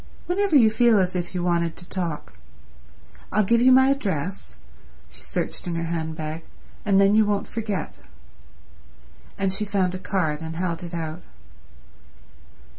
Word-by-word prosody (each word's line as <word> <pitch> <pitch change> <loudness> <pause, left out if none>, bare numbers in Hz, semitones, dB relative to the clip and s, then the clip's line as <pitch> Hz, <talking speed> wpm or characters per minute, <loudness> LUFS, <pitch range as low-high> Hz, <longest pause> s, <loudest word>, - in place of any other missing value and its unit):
Whenever 390 -1 +1
you 225 -6 +6
feel 230 0 +4
as 185 0 0
if 175 +1 -3
you 175 - -1
wanted 170 -2 0
to 175 - -12
talk. 170 - -4 1.0
I'll 215 - +3
give 235 +4 +3
you 255 +1 +6
my 265 +1 +6
address"—she 65 - -6
searched 65 - -4
in 170 - -2
her 165 - -2
handbag—"and 160 +4 -3
then 200 +1 +5
you 220 +1 +6
won't 205 -1 0
forget." 210 -4 -4 1.4
And 195 -1 0
she 195 - -1
found 195 -3 0
a 185 - -4
card 165 -6 -1
and 160 0 -5
held 170 -1 -2
it 175 -1 -6
out. 160 +1 -4
180 Hz, 145 wpm, -24 LUFS, 165-210 Hz, 1.4 s, you